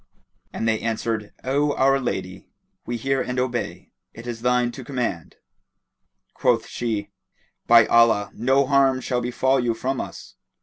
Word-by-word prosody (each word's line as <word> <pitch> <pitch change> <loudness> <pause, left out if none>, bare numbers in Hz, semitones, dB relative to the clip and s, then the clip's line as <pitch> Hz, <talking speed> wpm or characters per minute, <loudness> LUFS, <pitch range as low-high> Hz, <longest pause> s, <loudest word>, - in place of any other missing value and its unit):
And 115 - -3
they 110 -1 +1
answered, 110 -2 -2
"O 145 +3 +1
our 135 +1 +3
lady, 95 -7 -4 0.4
we 120 - -2
hear 135 +3 0
and 125 0 -4
obey: 125 -2 -3 0.2
it 115 - -10
is 120 -2 -5
thine 125 0 +2
to 130 - -9
command." 120 - -4 1.0
Quoth - - +1
she, 105 -4 -3 0.6
"By 115 -1 +7
Allah, 115 -3 +4
no 135 +4 +2
harm 135 -1 +3
shall 125 -1 -2
befall 130 +2 +1
you 120 -2 0
from 130 +3 -2
us!" - - -10
120 Hz, 145 wpm, -23 LUFS, 115-130 Hz, 1.0 s, By